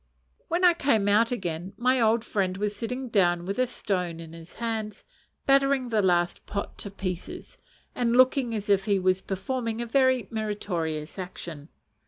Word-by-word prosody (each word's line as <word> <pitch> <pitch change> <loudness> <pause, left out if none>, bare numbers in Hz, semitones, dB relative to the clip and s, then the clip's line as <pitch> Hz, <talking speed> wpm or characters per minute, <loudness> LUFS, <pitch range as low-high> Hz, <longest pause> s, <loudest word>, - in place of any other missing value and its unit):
When 350 +2 +2
I 350 - +7
came 230 -11 +2
out 220 +4 +4
again, 180 -4 -3
my 250 +2 +2
old 225 +1 +3
friend 190 -3 -1
was 205 +1 -1
sitting 250 +4 -4
down 175 -5 +2
with 195 +5 -3
a 255 - +3
stone 180 -8 -2
in 165 -1 -10
his 165 +1 -12
hand, 220 -3 -4 0.4
battering 275 -2 +3
the 220 -2 +2
last 175 -2 +1
pot 200 -1 -4
to 200 - -5
pieces, 185 -2 -6 0.4
and 240 0 +1
looking 255 -2 +4
as 210 0 -4
if 200 -1 +3
he 200 -2 +2
was 185 0 +2
performing 230 +4 -3
a 240 - -2
very 260 -2 +2
meritorious 180 -8 -3
action. 170 -4 -7
210 Hz, 170 wpm, -27 LUFS, 185-240 Hz, 0.4 s, I